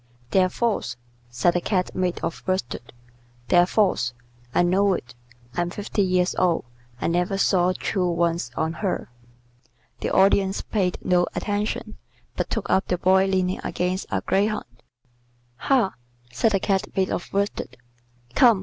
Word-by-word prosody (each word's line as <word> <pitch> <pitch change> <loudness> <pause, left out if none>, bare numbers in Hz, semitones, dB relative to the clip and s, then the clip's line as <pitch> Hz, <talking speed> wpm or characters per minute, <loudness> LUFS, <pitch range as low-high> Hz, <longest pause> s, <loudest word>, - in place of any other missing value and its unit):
"They're 185 -1 +4
false," 200 - -1 0.3
said 125 +8 +2
the 175 - 0
Cat 185 -2 0
made 180 -1 -1
of 165 - -3
worsted. 125 -10 -2 0.6
"They're 175 0 +5
false. 185 - +1 0.4
I 175 - +3
know 190 +3 +3
it. 120 -7 -8 0.4
I'm 175 0 0
fifty 205 +2 -2
years 185 -1 +2
old. 175 -6 +2 0.3
I - - -3
never 180 +3 +1
saw 185 -2 +3
true 180 -2 0
ones 170 -5 0
on 160 +1 0
her." 195 - -2 0.9
The - - -2
Audience 195 0 +3
paid 185 -4 0
no 175 -1 +3
attention, 210 +1 -2 0.4
but - - -2
took - - -2
up 190 - +2
the 180 - 0
Boy 190 +2 +4
leaning 185 -1 0
against 180 +2 -2
a - - -1
greyhound. 210 +2 0 0.9
"Ha!" 250 - +2 0.4
said 165 - +1
the 195 - +3
Cat 195 0 0
made 190 -1 +2
of - - -3
worsted. 200 -10 -2 0.6
"Come. 235 -6 +6
185 Hz, 150 wpm, -24 LUFS, 175-195 Hz, 0.9 s, Come